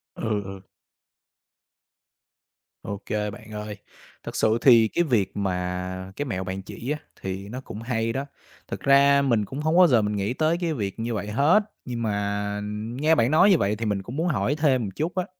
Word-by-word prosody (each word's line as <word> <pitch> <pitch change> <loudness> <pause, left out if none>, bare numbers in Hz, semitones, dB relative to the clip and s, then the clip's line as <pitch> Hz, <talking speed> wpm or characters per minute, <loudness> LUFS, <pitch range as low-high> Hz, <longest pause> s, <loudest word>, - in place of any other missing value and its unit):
Ừ, 105 -2 -1
ừ. 95 0 -8 2.2
Ô 100 0 -5
kê, 105 -1 -2
bạn 110 0 -12
ơi, 105 0 -6 0.5
thật - - -7
sự 110 +1 +2
thì 115 -4 +7
cái 175 - +1
việc 110 - 0
mà 90 0 -3
cái 145 - -3
mẹo 95 -8 -3
bạn 95 +1 -4
chỉ 120 +7 -6
á, 150 - -2 0.2
thì 95 +1 -5
nó 130 +3 -6
cũng 110 -4 -8
hay 115 -1 -1
đó. 135 +1 -2 0.4
Thực - - -5
ra 140 0 +5
mình 115 -6 +2
cũng 135 +7 -7
hông 155 +2 +1
bao 180 -1 +8
giờ 120 -6 +4
mình 105 0 -1
nghĩ 100 +4 -1
tới 160 +4 +1
cái 165 -2 0
việc 100 -4 -4
như 115 +1 -2
vậy 105 -1 -3
hết, 145 - +4 0.2
nhưng 120 -2 -4
mà 100 -1 -1 0.4
nghe 160 +2 +4
bạn 120 -3 +2
nói 180 +6 +6
như 185 - +6
vậy 100 -2 +1
thì 115 +1 -4
mình 100 -2 0
cũng 120 +6 -8
muốn 165 +3 0
hỏi 125 - +1
thêm 145 -5 +2
một 100 - -3
chút 165 +3 -2
á, 185 -1 0
115 Hz, 205 wpm, -25 LUFS, 100-140 Hz, 2.2 s, bao